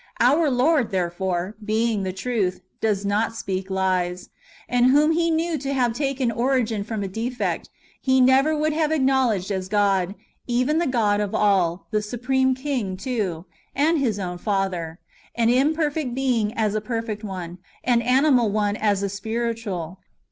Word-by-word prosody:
Our 295 +6 +4
Lord, 265 0 +2
therefore, 185 +1 -2
being 220 0 0
the 190 -1 -2
truth, 185 -3 -2 0.2
did 205 -2 0
not 215 +3 0
speak 190 -3 -4
lies; 185 -1 -1 0.4
and 245 0 +3
whom 295 +4 +4
He 335 +1 +1
knew 325 -1 0
to 275 +1 -3
have 245 -3 +1
taken 270 -2 -1
origin 235 -3 0
from 215 -1 -4
a - - -2
defect, 230 +6 -3 0.3
He 260 -1 +3
never 265 +4 +4
would 305 +1 +1
have 310 -1 +1
acknowledo; 265 - +2
ed 205 - -6
as 185 -1 -3
God, 195 -2 +1 0.3
even 255 +6 +1
the 340 - +1
God 215 -5 +2
of 205 -2 -2
all, 185 -4 +2
the 215 -1 +1
Supreme 255 +4 0
King, 255 -9 -3
too, 195 -8 -3 0.3
and 310 +3 +2
His 235 -7 0
own 180 -3 -4
Father, 185 -5 -2 0.4
an 230 -1 +2
imperfect 295 0 +1
being 245 -6 +1
as 215 -2 0
a 215 - -1
perfect 225 -1 -4
one, 180 -3 -6 0.2
an 240 -1 +3
animal 250 -1 +3
one 205 0 0
as 205 -2 +1
a - - +1
spiritual. 200 -4 -4
225 Hz, 160 wpm, -23 LUFS, 195-260 Hz, 0.4 s, Our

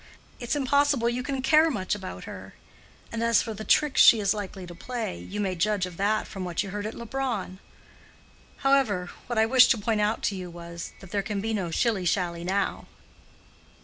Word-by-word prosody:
It's 240 +3 -2
impossible 280 -3 +2
you 240 +1 -2
can 265 0 -3
care 310 +4 +5
much 205 -10 -2
about 195 -3 -6
her. - - -10 0.6
And 230 - -3
as 230 -1 +3
for 225 - -5
the 215 - -7
tricks 295 +4 +3
she 230 - +8
is 200 -1 +2
likely 195 -3 -6
to 175 - -9
play, 225 - -5
you 90 - -7
may 195 -2 0
judge 200 +2 0
of 180 -2 -9
that 210 +2 +1
from 195 -3 -7
what 180 +1 -2
you 195 - -7
heard 205 +1 -3
at 220 - -7
Leubronn. 235 -6 -4 1.1
However, 225 -10 +2 0.2
what 240 -1 -3
I 220 - +5
wished 255 +2 +6
to - - +4
point 215 0 0
out 210 +2 0
to 200 - 0
you 180 -1 -6
was, 170 0 -8
that 195 -2 -13
there 205 -1 0
can 200 +1 -3
be 220 +2 -2
no 190 -5 -2
shilly 195 +2 0
shally 170 -1 0
now." 190 +2 -1
210 Hz, 205 wpm, -26 LUFS, 185-235 Hz, 1.1 s, she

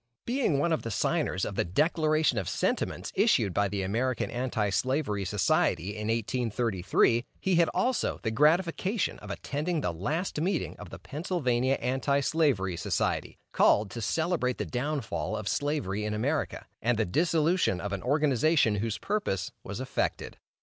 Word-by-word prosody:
Being 240 - +1
one 165 +4 +2
of 160 - 0
the 115 - -5
signers 105 - 0
of - - -4
the - - +1
"Declaration 155 - +2
of 95 - -3
Sentiments," - - -1
issued 95 - +3
by 100 +3 +2
the 100 -1 -2
American 115 +5 -1
Anti 120 -4 -1
slavery 130 -4 0
Society 90 -1 +1
in 105 0 -4
1833, 115 -1 +1 0.2
he 190 -1 +1
had 170 -2 +4
also 245 +7 0
the 110 - 0
gratification 170 - +1
of - - -11
attending 155 +3 -2
the 90 - -1
last 150 - -2
meeting 180 0 -1
of - - -9
the - - -8
Pennsylvania 135 -5 0
Anti 135 +2 0
slavery 135 - +1
Society, - - -1
called 105 -1 +3
to 115 - -5
celebrate 160 - 0
the - - -2
downfall 125 - -2
of 105 - -5
Slavery 145 -9 -1
in 105 0 -2
America, 140 +8 -1 0.2
and 120 0 +1
the 110 - +2
dissolution 160 - +2
of 100 +3 -4
an 95 - -3
organization 145 -3 +2
whose 110 +1 -2
purpose 110 - -2
was 100 +3 -6
effected. 130 0 -3
130 Hz, 155 wpm, -28 LUFS, 105-155 Hz, 0.2 s, had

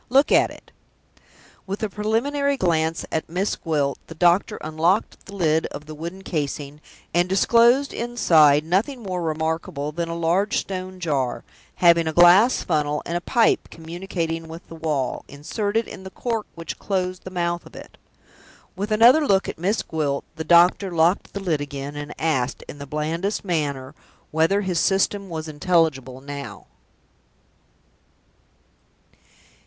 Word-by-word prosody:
Look 270 +4 +4
at - - +5
it!" - - -15 1.0
With 195 +3 -4
a - - +1
preliminary 275 +8 0
glance 165 -5 0
at 160 - -2
Miss 185 +5 -1
Gwilt, 145 -4 -1
the 165 - -10
doctor 175 +3 +3
unlocked 165 +7 0
the 200 - -9
lid 160 -4 +1
of 145 +1 -9
the 155 - -9
wooden 170 +5 -7
casing, 145 -3 -4 0.3
and 175 +2 +2
disclosed 235 +7 +4
inside 165 -12 +4
nothing 225 - 0
more 185 -3 -3
remarkable 160 -2 -2
than 170 +2 -3
a 165 - -3
large 170 +5 +1
stone 185 -1 -4
jar, 140 -7 -1 0.3
having 170 -2 +4
a 160 - -1
glass 180 +9 +6
funnel, 150 -3 -1
and 170 - -3
a 175 - -1
pipe 230 +5 +2
communicating 165 -1 -5
with 165 +1 -10
the 165 - -9
wall, 150 -6 -2
inserted 205 +10 -2
in - - -10
the 190 - -7
cork 225 +2 -3
which 165 0 -7
closed 185 -2 -2
the - - -7
mouth 175 -1 -2
of - - -16
it. - - -11 0.8
With 200 +3 -3
another 245 +8 +6
look 195 -1 +3
at - - -6
Miss 200 +6 0
Gwilt, 145 -3 -2
the 160 - -4
doctor 175 +4 +5
locked 170 +2 +1
the 200 - -5
lid 170 -7 -1
again, 145 0 -6
and 145 0 -6
asked, 135 -6 -1
in 145 - -10
the 140 - -8
blandest 165 +9 -2
manner, 145 -6 -2 0.4
whether 165 +6 +2
his 185 -4 -1
System 195 +1 +1
was 160 -1 -5
intelligible 145 -5 0
now? 140 0 -8
170 Hz, 150 wpm, -23 LUFS, 155-195 Hz, 1.0 s, glass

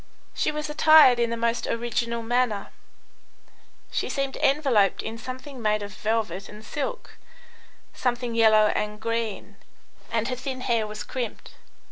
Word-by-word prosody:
She - - 0
was 300 0 -3
attired 300 -4 +6
in 235 -1 +2
the 230 - -2
most 230 0 -1
original 235 0 -2
manner; 230 -3 0 1.2
she - - -2
seemed 275 -1 -2
enveloped 270 -9 +2
in 225 +1 -6
something 255 +2 -8
made 215 -1 +1
of 205 -1 -7
velvet 210 -3 -2
and 210 +1 -12
silk, 485 +12 -5 0.7
something 245 -1 -1
yellow 215 -2 +5
and 210 0 -3
green, 230 -2 -3 0.5
and 230 -1 0
her 255 - -2
thin 255 0 -5
hair 230 -4 0
was 210 0 -6
crimped. 245 -4 -6
235 Hz, 140 wpm, -25 LUFS, 215-255 Hz, 1.2 s, attired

